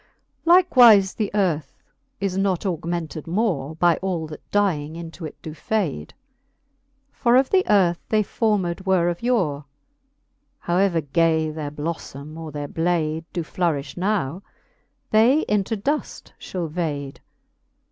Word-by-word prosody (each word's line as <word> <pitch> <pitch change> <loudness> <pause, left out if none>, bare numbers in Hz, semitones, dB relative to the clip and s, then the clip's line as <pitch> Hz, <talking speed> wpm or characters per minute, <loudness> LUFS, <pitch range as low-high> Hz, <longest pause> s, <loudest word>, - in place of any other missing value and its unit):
XL. - - -1
Likewife 245 - +6
the 210 -3 -1
earth 175 -7 -1 0.4
is 195 -2 -2
not 195 -1 0
augmented 170 -3 -3
more 170 -6 -1
By 170 +1 +3
all 180 -4 -2
that 155 -1 -9
dying 165 -7 0
into 165 0 -7
it - - -14
doe 155 - -6
fade. 155 - -3 1.0
For 240 -1 +2
of 260 +1 +3
the 375 -1 +4
earth 180 -4 +3
they 215 -1 +3
formed 200 -5 -1
were 185 -3 +2
of 175 0 -4
yore: 180 - 0 1.0
How 175 +1 -1
ever 185 -4 +2
gay 160 +2 +1
their 155 -1 -5
blofTome 150 -1 -6
or 160 -1 -7
their 145 0 -5
blade 165 -1 -1
Doe 175 - -3
flourifh 155 -5 -2
now, 185 -4 -1 0.7
they 235 +8 +5
into 210 -2 0
duft 285 +9 -3
fhall 180 -3 -4
vade. 150 -4 -4
175 Hz, 135 wpm, -23 LUFS, 155-200 Hz, 1.0 s, Likewife